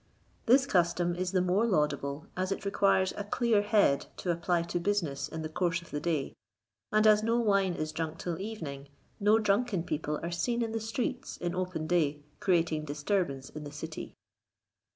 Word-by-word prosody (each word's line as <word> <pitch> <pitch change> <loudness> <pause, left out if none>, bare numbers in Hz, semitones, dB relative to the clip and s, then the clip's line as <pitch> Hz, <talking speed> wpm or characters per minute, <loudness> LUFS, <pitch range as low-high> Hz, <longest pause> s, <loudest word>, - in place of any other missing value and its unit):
This 265 +4 +6
custom 175 -5 +2
is 180 0 -2
the 185 -2 +2
more 185 +4 +2
laudable, 150 -7 0
as 185 +1 -1
it 195 - -3
requires 195 -1 +2
a 205 - -3
clear 220 0 +2
head 205 -9 +3
to 180 - -1
apply 170 0 +1
to 170 +1 -2
business 170 -7 -1
in 160 0 -6
the - - -2
course 170 +2 0
of 170 - -15
the 150 - -2
day; 155 -3 -1 0.6
and 215 0 +4
as 215 -1 +6
no 230 +2 +1
wine 200 -5 +2
is 155 -1 -3
drunk 160 0 -3
till 170 -1 -4
evening, 155 -10 -6 0.3
no 210 +1 +5
drunken 210 -3 +1
people 150 -2 -2
are 170 - -3
seen 235 +8 0
in 225 - -3
the 225 - -1
streets 245 +3 -3
in 175 0 -3
open 180 -3 -2
day 155 -4 +1 0.2
creating 165 -4 +1
disturbance 145 -2 -1
in 155 - -7
the 145 - -7
city. 155 +2 -7
175 Hz, 185 wpm, -30 LUFS, 155-205 Hz, 0.6 s, This